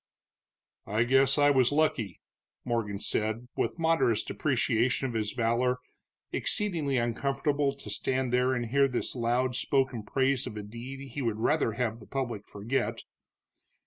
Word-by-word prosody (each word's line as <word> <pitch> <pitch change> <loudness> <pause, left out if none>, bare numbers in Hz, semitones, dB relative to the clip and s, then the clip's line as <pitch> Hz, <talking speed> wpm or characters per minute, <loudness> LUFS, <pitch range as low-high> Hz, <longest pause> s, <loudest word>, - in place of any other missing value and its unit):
"I 105 +3 +2
guess 135 +4 +4
I 145 0 +5
was 130 -2 +4
lucky," 145 - 0 0.4
Morgan 115 -4 -1
said, 110 +3 -1
with - - -1
modest 160 -9 +2
depreciation 120 +2 +1
of 120 - -5
his 110 -2 -1
valor, 120 +2 +1 0.5
exceedingly 165 -10 0
uncomfortable 140 +4 0
to 140 - -10
stand 130 -1 0
there 125 +1 +3
and 120 -1 -1
hear 140 +4 +3
this 125 -2 -2
loud 125 +1 0
spoken 130 -3 +1
praise 130 +4 +1
of 105 - -7
a 105 - -5
deed 130 +6 -8
he 140 - -4
would 115 -4 -1
rather 130 0 +1
have 115 -1 -2
the - - -14
public 120 -7 -3
forget. 110 +7 -2
125 Hz, 145 wpm, -29 LUFS, 115-135 Hz, 0.5 s, I